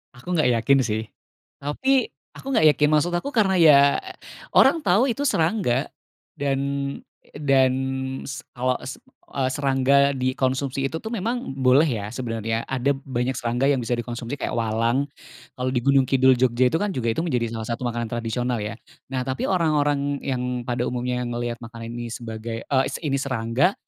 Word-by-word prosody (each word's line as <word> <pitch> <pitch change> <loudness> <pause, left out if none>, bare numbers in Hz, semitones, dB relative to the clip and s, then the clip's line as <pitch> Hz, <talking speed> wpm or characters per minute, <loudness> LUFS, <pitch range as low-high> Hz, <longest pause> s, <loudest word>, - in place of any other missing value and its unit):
Aku 175 +9 -4
gak 155 -6 +3
yakin 130 +4 +3
sih, 110 -1 -2 0.5
tapi 265 - 0 0.2
aku 270 - -6
gak 155 -11 +5
yakin 150 0 +4
maksud 155 +3 +2
aku 275 +12 -2
karena 205 -7 +2
ya 155 -5 +7 0.7
orang 295 +4 +5
tau 200 +8 +3
itu 270 +3 -1
serangga 160 - +1 0.5
dan, 140 -2 -1 0.7
dan 135 -3 +3 0.6
s 140 +3 -6 0.2
awa 130 0 +1
s 130 - -7 0.3
eee, 130 -2 0
serangga 140 0 +3
dikonsumsi 130 +1 -1
itu 160 - -3
tuh 220 - -8
memang 230 - -3
boleh 135 +4 +4
ya 110 -7 -2
sebenarnya 115 -2 -3
ada 135 +1 0
banyak 130 -2 -2
serangga 120 +3 0
yang 135 - +1
bisa 120 0 -1
dikonsumsi 120 +2 -5
kayak - - -3
walang 115 +4 0 0.5
kalau 130 0 -1
di - - +3
Gunung 135 0 +4
Kidul 130 -1 +4
Jogja 125 0 +3
itu 160 - +1
kan 205 +2 -1
juga 115 -2 0
itu 160 - -1
menjadi 125 -8 -1
salah 110 -1 -5
satu 115 - -4
makanan 120 -1 -3
tradisional 120 +1 -2
ya 105 +2 -4 0.4
nah 130 -1 -1
tapi 130 0 -2
orang-orang 145 -5 +1
yang 125 -2 -2
pada 120 -1 -1
umumnya 125 0 -2
ngelihat 120 0 -3
makanan 115 0 -8
ini 120 0 -5
sebagai, 115 0 -6
eee, 135 -1 +1 0.2
ini 140 -1 +1
serangga, 130 - +1
130 Hz, 165 wpm, -23 LUFS, 120-145 Hz, 0.7 s, ya